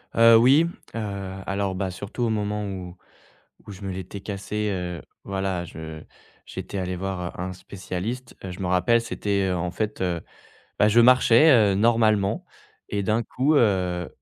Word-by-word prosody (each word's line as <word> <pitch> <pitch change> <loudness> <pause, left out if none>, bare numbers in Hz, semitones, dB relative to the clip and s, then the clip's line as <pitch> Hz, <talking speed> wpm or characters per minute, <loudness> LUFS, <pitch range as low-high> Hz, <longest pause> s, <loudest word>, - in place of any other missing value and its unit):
Heu, 115 0 +7
oui, 135 +8 +5 0.3
heu, 115 - -2 0.5
alors 95 -1 -2
bah, 95 0 -2
surtout 100 +6 -5
au 115 - +1
moment 105 -1 -1
où 90 -2 -7 0.7
où 105 - -8
je 95 +1 -12
me 95 - -4
l'étais 95 +2 -6
cassé 105 +2 -3
heu, 90 -3 -4 0.2
voilà, 95 -2 -2
je 80 -1 -8 0.4
j'étais 100 - -6
allé 90 -1 -2
voir 90 -1 -4
un 90 +1 -3
spécialiste. 100 +6 -6
Je 90 -1 -7
me 95 - -2
rappelle, 90 +6 +3
c'était 100 -4 -1
en 90 -1 -1
fait, 105 +1 -3
heu, 90 -3 -1 0.6
bah, 105 - +5
je 115 +3 +5
marchais, 125 +4 +6
heu, 110 -7 +5
normalement 110 -2 +2 0.5
et 100 -1 -1
d'un 110 +4 +1
coup, 135 +7 0
heu, 90 - +1
100 Hz, 160 wpm, -24 LUFS, 90-110 Hz, 0.7 s, Heu